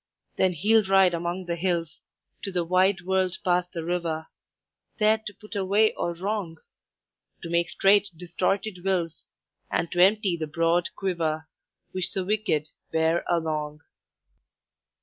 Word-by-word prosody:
"Then 185 -1 +2
he'll 215 +7 +3
ride 190 -2 +5
among 175 +2 -3
the 170 -1 -2
hills 170 -2 -2 0.4
To 195 - -4
the 180 -2 0
wide 185 +1 +3
world 185 0 0
past 180 0 +1
the 165 - -5
river, 165 -2 -2 0.7
There 215 0 +3
to 215 -1 -8
put 210 +1 -11
away 200 +3 +3
all 170 0 -3
wrong; 190 -2 -3 0.9
To 170 - -6
make 170 0 +1
straight 200 +1 +4
distorted 180 +2 -2
wills, 180 -4 -1 0.4
And 170 - -1
to 175 - +2
empty 200 -2 +3
the 160 -1 -3
broad 165 +2 +1
quiver 160 -5 -2 0.4
Which 185 -2 -2
the 190 -1 -2
wicked 195 -7 0 0.2
bear 160 +1 +2
along. 155 -3 -1
180 Hz, 140 wpm, -26 LUFS, 165-195 Hz, 0.9 s, ride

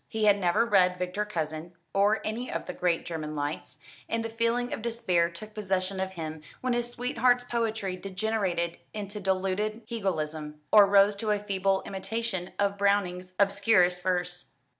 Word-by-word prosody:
He 220 -1 -1
had 205 -1 +5
never 180 +4 +3
read 185 -5 +4
Victor 180 +3 -2
Cousin, 160 -3 -4 0.2
or 205 +2 +3
any 230 +4 -3
of - - -3
the 180 - -5
great 175 -2 0
German 155 -2 -4
lights; 145 +1 -4 0.3
and 230 0 -1
a - - -3
feeling 230 +2 0
of - - -4
despair 220 -8 +1
took 210 +5 -9
possession 190 -2 -1
of 190 0 -2
him 160 -3 -6 0.2
when 255 -1 0
his 240 0 0
sweetheart's 245 0 +2
poetry 225 -6 -2
degenerated 190 -3 -1 0.2
into 205 0 -5
diluted 195 +3 -1
Hegelism, 155 -9 -3
or 205 -2 +8
rose 200 +1 +5
to 215 +1 -2
a 210 - +3
feeble 195 -1 0
imitation 195 -1 -3
of 200 0 0
Browning's 185 -3 +1
obscurest 200 -3 +3
verse. 180 -1 -2
195 Hz, 160 wpm, -28 LUFS, 180-220 Hz, 0.3 s, or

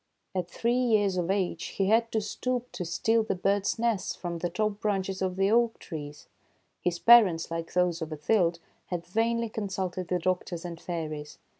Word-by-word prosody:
At 180 -2 -2
three 235 +6 0
years 215 -6 +2
of 175 0 -1
age 190 -4 0
he 195 -1 +2
had 230 +1 +3
to 220 - +1
stoop 250 +4 -3
to 180 - -4
steal 225 +7 +2
the 220 - -1
birds' 200 +3 +1
nests 230 -4 0
from 170 -2 -5
the 175 - -1
top 210 +3 -1
branches 195 -2 -1
of 185 -1 0
the 195 +2 +2
oak 235 0 +3
trees. 150 -3 -8 0.6
His 175 -1 0
parents, 195 -8 +6
like 165 0 -4
those 180 -1 +1
of 160 - -3
Othilde, 170 +3 +1 0.3
had 175 -2 -4
vainly 230 +5 0
consulted 190 -4 -3
the 180 - +1
doctors 180 -1 -2
and 170 -1 -7
fairies. 155 -4 -5
185 Hz, 180 wpm, -28 LUFS, 170-220 Hz, 0.6 s, parents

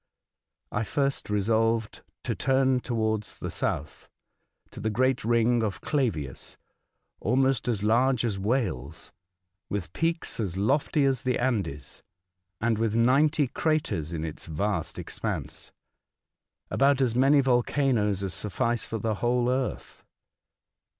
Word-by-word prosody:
I 105 - -1
first 140 +2 -1
resolved 110 +2 +1 0.2
to - - -1
turn 130 -1 +2
towards 110 -3 -2
the - - -5
south, 75 - -3 0.6
to - - -9
the 110 - -1
great 130 +3 +1
ring 120 +1 +3
of 105 -3 -2
Clavius, 100 - -2 0.3
— - - -52
almost 130 +3 +1
as 110 -5 0
large 120 +3 +3
as 105 -4 -1
Wales, 100 - -2 0.6
with 100 -3 -4
peaks 165 -4 -1
as 95 -5 -2
lofty 140 +7 +2
as 135 -3 +1
the 125 -1 0
Andes, 95 - -2 0.6
and 115 -1 +1
with 110 -1 0
ninety 140 +6 +4
craters 120 - -1
in 80 -1 -3
its 80 - -7
vast 100 +6 -2
expanse, - - -5 0.5
— - - -53
about 140 0 +3
as 125 -4 +2
many 135 +4 +5
volcanoes 120 -5 +2
as 95 - -3
sufl&ce 115 +3 -1
for 115 - -3
the 110 +1 -1
whole 120 0 +2
earth. 130 0 -3
115 Hz, 130 wpm, -27 LUFS, 105-130 Hz, 0.6 s, many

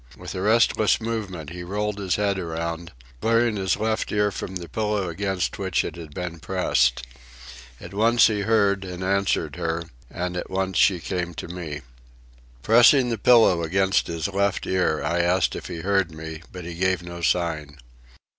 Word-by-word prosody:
With 90 -1 -8
a 95 - -4
restless 110 0 +3
movement 100 -9 -4
he 90 0 -7
rolled 105 +3 -3
his 95 -3 0
head 100 -2 0
around, 85 0 -4 0.3
clearing 115 0 +2
his 95 -2 0
left 110 0 -1
ear 105 0 +2
from 95 0 -6
the 85 -2 -5
pillow 105 -2 -1
against 95 +1 -2
which 95 -3 0
it 80 - -5
had 80 -3 -9
been 85 +1 -5
pressed. 70 -8 +1 0.7
At - - -10
once 115 +3 +4
he 105 -2 +2
heard 100 -2 +2
and 90 -1 -6
answered 95 -5 0
her, 85 -1 -2 0.3
and 90 0 -4
at 90 - -4
once 95 -1 -1
she 95 -3 +4
came 85 0 -3
to - - -6
me. 85 -4 -6 0.8
Pressing 120 - +6
the 115 -3 -2
pillow 110 -7 +5
against 95 +4 +1
his 85 -2 -2
left 100 -1 0
ear, 90 -4 0
I 85 +1 0
asked 90 0 +2
him - - -4
if - - -10
he 85 -3 -6
heard 95 -1 +1
me, 80 0 -8
but 90 -2 -8
he 85 - -6
gave 90 0 0
no 85 0 -8
sign. 80 -4 -1
95 Hz, 180 wpm, -24 LUFS, 85-100 Hz, 0.8 s, Pressing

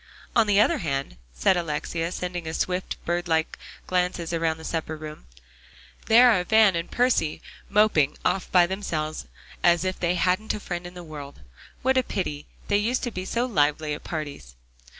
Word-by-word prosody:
"On 230 -2 +4
the 205 -1 +4
other 215 - +3
hand," 135 - -3
said - - +2
Alexia, 165 0 -2
sending 175 -3 -4
swift, 180 +2 -2
bird 175 +1 -1
like 160 -1 0 0.3
glances 180 -2 -1
around 165 -1 0
the 160 - -11
supper 160 -1 -3
room, 155 - -9 0.8
"there 240 +2 +7
are 185 -5 +2
Van 215 -1 +5
and 170 0 -3
Percy 245 -11 +1 0.3
moping 200 -9 +3
off 190 - 0
by 180 -2 +6
themselves 165 -5 -3 0.3
as 175 +1 +4
if 185 0 -2
they 175 0 +1
hadn't 185 +5 +1
a - - -5
friend 175 -3 -5
in 175 - -12
the 175 - -8
world. 145 -3 -9 0.4
What 260 +1 +4
a - - +3
pity; 150 -10 -4 0.2
they 205 - +3
used 235 +5 0
to 240 - -2
be 185 -3 -5
so 235 +5 0
lively 150 - +1
at 145 - -7
parties." 145 - -6
175 Hz, 175 wpm, -25 LUFS, 155-200 Hz, 0.8 s, there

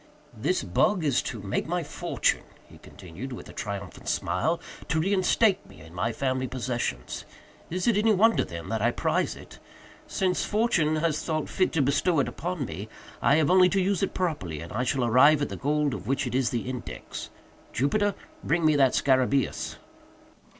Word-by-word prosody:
"This 150 +12 0
bug 165 - +2
is 140 -4 +2
to 110 -6 -6
make 100 +8 -2
my 175 +1 -1
fortune," 145 - 0 0.3
he - - -16
continued, 95 +8 -9
with 125 - -8
a - - -11
triumphant 100 -2 -6
smile, 160 - 0 0.3
"to 165 - +1
reinstate 195 +3 +2
me - - -15
in 80 +1 -13
my 90 +6 -1
family 130 +1 -1
possessions. 120 - -3 0.5
Is 180 +2 -2
it 235 - +3
any 215 +2 +3
wonder, 220 +3 +4
then, 85 -1 -7
that 110 -1 -1
I 120 - +4
prize - - 0
it? - - -13 0.5
Since 185 -1 0
Fortune 205 -8 +2
has 155 -1 0
thought 155 -2 -1
fit 185 - +1
to 155 -4 +2
bestow 145 +4 +2
it 140 - +2
upon 175 -4 -3
me, 100 +3 -7 0.3
I 140 - +4
have 155 +1 +3
only 185 0 +6
to 195 - +1
use 190 0 +1
it 195 - -1
properly 145 - -2
and 85 - -8
I 120 +4 0
shall 125 -1 +1
arrive 140 +6 +6
at - - -2
the - - -5
gold 145 0 0
of - - -6
which 135 +1 0
it 125 - -4
is 130 -2 +2
the 120 -1 -3
index. 125 -2 -6 0.4
Jupiter; 205 - +1 0.3
bring 165 +2 +1
me 155 -1 +5
that 135 -2 +4
_scarabæus! 130 0 +1
140 Hz, 185 wpm, -27 LUFS, 120-180 Hz, 0.5 s, only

